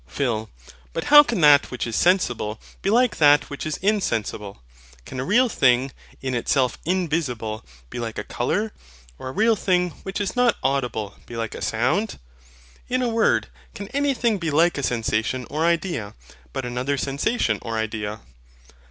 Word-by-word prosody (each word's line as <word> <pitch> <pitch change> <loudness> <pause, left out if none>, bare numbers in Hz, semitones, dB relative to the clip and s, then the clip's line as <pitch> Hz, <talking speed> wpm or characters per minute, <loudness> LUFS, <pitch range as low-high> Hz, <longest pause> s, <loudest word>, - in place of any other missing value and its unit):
PHIL. 110 -6 -2 0.4
But - - -2
how 295 - +12
can 240 -10 -2
that 145 -1 +6
which 125 - -3
is 115 -2 -4
sensible 120 - +1 0.2
be - - 0
like 245 +3 +3
that 145 -1 +5
which 140 - -5
is 155 - -2
insensible? 110 - -1 0.4
Can 130 - -7
a - - -1
real 240 - +3
thing, 130 - +2 0.3
in 130 -1 -2
itself 125 +1 +1
INVISIBLE, 150 -11 -1 0.3
be - - -5
like 115 -2 -5
a - - -3
COLOUR; 205 - -1 0.5
or 130 - -6
a - - -5
real 220 +9 +3
thing, 180 -3 +1
which 195 +1 -5
is 205 +3 -2
not 245 -2 +3
AUDIBLE, 125 -6 -1
be 120 - -8
like 115 -1 -3
a - - -8
SOUND? 130 - 0 0.7
In 255 +1 +1
a 245 - +1
word, 225 0 +2 0.3
can 200 0 -7
anything 255 -6 +1
be 165 -2 -2
like 160 +1 +3
a - - -1
sensation 115 0 -1
or 155 +3 0
idea, 165 - -1 0.4
but 130 - -4
another 125 +3 -2
sensation 140 - 0
or 115 -1 -4
idea? 110 -1 -3
140 Hz, 170 wpm, -23 LUFS, 120-195 Hz, 0.7 s, how